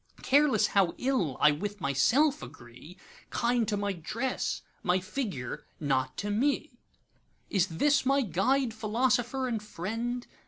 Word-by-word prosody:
Careless 275 Hz, -5 st, +4 dB
how 195 Hz, -4 st, +2 dB
ill 250 Hz, -, 0 dB
I 150 Hz, -, +6 dB
with 205 Hz, +7 st, -4 dB
myself 255 Hz, -, +2 dB
agree, 120 Hz, +9 st, -12 dB, 0.3 s
Kind 235 Hz, -2 st, +1 dB
to 205 Hz, -1 st, 0 dB
my 200 Hz, 0 st, -1 dB
dress, 230 Hz, +9 st, -3 dB, 0.2 s
my 180 Hz, +1 st, +2 dB
figure,—not 145 Hz, -, -3 dB
to 205 Hz, 0 st, -2 dB
me. 265 Hz, +3 st, 0 dB, 0.7 s
Is 195 Hz, -2 st, +2 dB
this 280 Hz, -, +2 dB
my 275 Hz, +1 st, +3 dB
Guide, 235 Hz, -, +1 dB
Philosopher, 245 Hz, +4 st, 0 dB
and 230 Hz, -4 st, -2 dB
Friend? 230 Hz, +5 st, -4 dB
215 Hz, 125 wpm, -29 LUFS, 180-260 Hz, 0.7 s, I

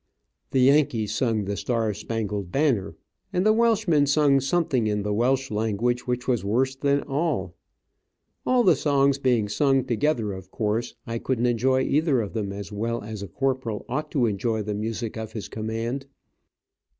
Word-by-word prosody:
The 130 Hz, -, +2 dB
Yankees 125 Hz, -6 st, +3 dB
sung 110 Hz, -3 st, 0 dB
the 100 Hz, +1 st, -2 dB
"Star 115 Hz, -1 st, -1 dB
Spangled 105 Hz, -3 st, -4 dB
Banner," 135 Hz, -9 st, +1 dB, 0.4 s
and 180 Hz, +2 st, 0 dB
the 215 Hz, -, +6 dB
Welchman 215 Hz, -10 st, +3 dB
sung 140 Hz, -1 st, +4 dB
something 135 Hz, -4 st, +1 dB
in 105 Hz, -1 st, 0 dB
the 105 Hz, 0 st, -1 dB
Welch 130 Hz, +4 st, +1 dB
language 110 Hz, +4 st, -1 dB
which 125 Hz, 0 st, -2 dB
was 120 Hz, -6 st, +1 dB
worse 130 Hz, +6 st, +1 dB
than 140 Hz, +1 st, +1 dB
all. 135 Hz, -, -1 dB, 0.9 s
All 250 Hz, -1 st, +3 dB
the 180 Hz, -6 st, +5 dB
songs 140 Hz, -1 st, +2 dB
being 125 Hz, -6 st, +2 dB
sung 135 Hz, +4 st, +2 dB
together, 120 Hz, -4 st, 0 dB
of 95 Hz, -1 st, -9 dB
course 110 Hz, +3 st, -2 dB
I 115 Hz, 0 st, -3 dB
couldn't 125 Hz, -1 st, -1 dB
enjoy 130 Hz, +2 st, +2 dB
either 150 Hz, -2 st, +2 dB
of 105 Hz, -3 st, -3 dB
them 105 Hz, -4 st, -2 dB
as 100 Hz, +1 st, -7 dB
well 115 Hz, +3 st, -2 dB
as 105 Hz, -1 st, -6 dB
a 100 Hz, -, -5 dB
Corporal 130 Hz, 0 st, -2 dB
ought 150 Hz, +5 st, -3 dB
to 135 Hz, -6 st, +3 dB
enjoy 110 Hz, +1 st, -1 dB
the 105 Hz, +1 st, -3 dB
music 110 Hz, +2 st, -4 dB
of 110 Hz, 0 st, -6 dB
his 110 Hz, -, -5 dB
command. 115 Hz, +5 st, -4 dB
120 Hz, 170 wpm, -25 LUFS, 110-140 Hz, 0.9 s, the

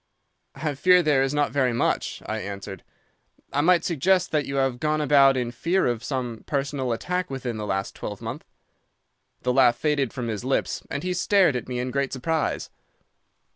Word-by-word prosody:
"'I 150 Hz, +2 st, -2 dB
fear 180 Hz, +5 st, +5 dB
there 145 Hz, -4 st, +3 dB
is 135 Hz, 0 st, +1 dB
not 145 Hz, -1 st, +1 dB
very 130 Hz, -4 st, +1 dB
much,' 115 Hz, -, -1 dB
I 110 Hz, 0 st, -3 dB
answered; 100 Hz, -1 st, -7 dB, 0.7 s
'I 145 Hz, -, +2 dB
might 170 Hz, +1 st, +4 dB
suggest 180 Hz, +3 st, +2 dB
that 150 Hz, -2 st, 0 dB
you 140 Hz, -, -4 dB
have 135 Hz, -2 st, 0 dB
gone 155 Hz, +1 st, 0 dB
about 140 Hz, -2 st, +5 dB
in 120 Hz, -2 st, -1 dB
fear 170 Hz, +10 st, 0 dB
of 120 Hz, -1 st, -1 dB
some 125 Hz, -5 st, -4 dB
personal 140 Hz, -3 st, -1 dB
attack 180 Hz, +10 st, -2 dB
within 125 Hz, -4 st, -4 dB
the 105 Hz, -1 st, -4 dB
last 95 Hz, 0 st, -2 dB
twelve -, -, -6 dB
months.' -, -, -7 dB, 1.0 s
"The 125 Hz, -, +1 dB
laugh 125 Hz, -2 st, +5 dB
faded 140 Hz, -2 st, 0 dB
from 125 Hz, -2 st, -4 dB
his 110 Hz, 0 st, -3 dB
lips, 130 Hz, +1 st, -1 dB
and 140 Hz, -, -4 dB
he 180 Hz, 0 st, -1 dB
stared 180 Hz, -4 st, +3 dB
at 125 Hz, -, -4 dB
me 125 Hz, -, -3 dB
in 125 Hz, +1 st, -2 dB
great 140 Hz, 0 st, -1 dB
surprise. 160 Hz, +4 st, -2 dB
135 Hz, 185 wpm, -25 LUFS, 125-155 Hz, 1.0 s, fear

